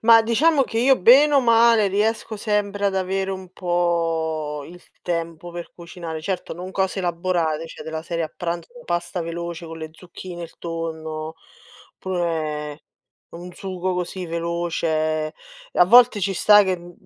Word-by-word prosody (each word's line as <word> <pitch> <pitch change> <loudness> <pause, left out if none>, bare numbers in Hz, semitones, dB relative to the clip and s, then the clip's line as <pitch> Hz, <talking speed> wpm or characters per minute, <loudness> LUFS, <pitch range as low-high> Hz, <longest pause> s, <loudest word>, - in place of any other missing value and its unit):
Ma 225 0 +7
diciamo 275 +7 +3
che 225 - -3
io 260 +2 +4
bene 275 +9 +7
o 280 - +6
male 230 -2 +5
riesco 215 +3 0
sempre 205 -1 0
ad 195 -1 0
avere 190 +1 -1
un 190 -1 -7
po' 165 -4 -1
il 175 +1 -13 0.2
tempo 170 0 -4
per 175 0 -7
cucinare, 170 -2 -7
certo 185 +3 -3
non 180 +3 -7
cose 190 0 -1
elaborate, 170 -3 -1
cioè - - -10
della 160 0 -5
serie 170 0 -2
a 155 - -8
pranzo, 170 -1 -4 0.2
pasta 175 +1 -2
veloce 170 0 -5
con 165 0 -8
le 160 -1 -7
zucchine, 175 +1 -9
il 165 - -11
tonno, 160 -1 -5 0.6
pure 160 -5 -3 0.5
un 175 +1 -9
sugo 185 0 -3
così 180 0 -4
veloce. 165 -2 -1 0.4
A - - +5
volte 235 +1 +6
ci 195 0 0
sta 210 +3 +6
che, 185 -1 0
mhmm, 175 0 -12
175 Hz, 155 wpm, -22 LUFS, 165-195 Hz, 0.6 s, Ma